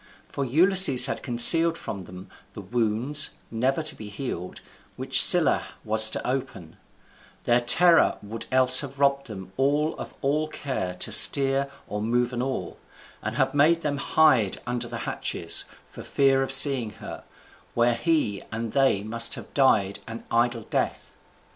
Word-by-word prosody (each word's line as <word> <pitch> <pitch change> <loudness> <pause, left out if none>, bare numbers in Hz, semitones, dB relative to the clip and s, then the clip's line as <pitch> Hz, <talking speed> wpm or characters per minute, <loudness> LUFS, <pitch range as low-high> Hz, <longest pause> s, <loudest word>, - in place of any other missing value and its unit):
For 140 - -6
Ulysses 160 -1 +3
had 135 - -5
concealed 165 +7 +5
from 95 -3 -9
them 90 +2 -13 0.3
the 105 - -10
wounds, 120 +7 -1 0.2
never 130 +7 -2
to 155 0 -2
be 105 -5 -11
healed, 100 -5 -8 0.4
which - - +6
Scylla - - +7 0.2
was 110 0 +2
to - - -6
open: 125 -10 -6 0.7
their 120 0 +1
terror 170 +7 +3
would 110 +2 -8
else 130 0 +5
have 140 -1 -8
robbed 140 -1 0
them 95 -4 -11
all 145 +4 -1
of - - -10
all 150 +3 -2
care 130 -12 -6
to 90 - -4
steer 135 0 +4 0.2
or 105 - -6
move 120 +3 -2
an 120 - -4
oar, 130 -8 -6 0.4
and - - -6
have - - -1
made 160 +4 +1
them 145 -1 -3
hide 130 -9 +1
under 120 0 -5
the - - -8
hatches, - - -4 0.2
for - - -13
fear 135 -1 0
of 135 - -3
seeing 135 -5 +2
her, - - -11 0.5
where 120 0 +1
he 120 - -2
and 115 0 -6
they 135 -8 0
must 115 +2 0
have - - -13
died 105 -8 0
an 115 0 -9
idle 120 0 -1
death. - - -5
125 Hz, 160 wpm, -23 LUFS, 110-140 Hz, 0.7 s, Scylla